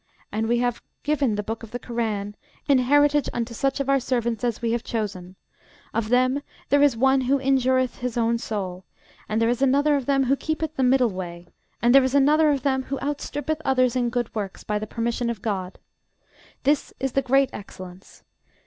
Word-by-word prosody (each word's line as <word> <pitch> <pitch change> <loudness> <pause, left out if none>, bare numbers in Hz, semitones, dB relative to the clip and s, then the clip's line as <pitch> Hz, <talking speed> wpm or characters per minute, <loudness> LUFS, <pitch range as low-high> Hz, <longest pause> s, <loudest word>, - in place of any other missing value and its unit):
And 220 +1 -1
we 240 - +3
have 245 0 -1 0.2
given 285 -7 +1
the 210 - -2
book 225 +2 -5
of 230 - -10
the 245 - -4
Korân 220 -4 -3 0.3
in 280 -3 +5
heritage 290 +2 +3
unto 235 0 -3
such 275 +4 -1
of 275 - -2
our 275 0 +3
servants 235 -3 -1
as 235 -3 -1
we 230 -1 -1
have 235 0 -1
chosen: 190 -5 -4 0.6
of 230 -2 -1
them 255 +3 +2 0.3
there 285 0 +4
is 285 -5 +4
one 265 +2 +3
who 265 +2 +2
injureth 260 -1 +1
his 245 -1 -4
own 230 0 +1
soul; 190 -5 -4 0.5
and 215 - 0
there 230 - +2
is 240 +2 0
another 285 +2 +3
of 275 -3 -2
them 275 -1 +3
who 265 +2 +2
keepeth 315 +1 -3
the 270 - -1
middle 255 -2 +3
way; 175 -2 -7 0.4
and 240 +1 +5
there 275 -1 +7
is 260 +1 0
another 300 +3 +5
of 280 -3 0
them 265 -2 +1
who 275 - -3
outstrippeth 290 +2 -3
others 255 -2 +2
in 245 -1 +1
good 240 -1 -2
works, 200 -3 -5
by 210 0 -1
the 215 - -5
permission 235 +2 -2
of 230 -5 -5
GOD. 190 -4 -3 0.9
This 290 +1 +1
is 270 0 -1
the 275 - +1
great 270 +1 +2
excellence. 185 -2 -11
245 Hz, 205 wpm, -24 LUFS, 225-275 Hz, 0.9 s, there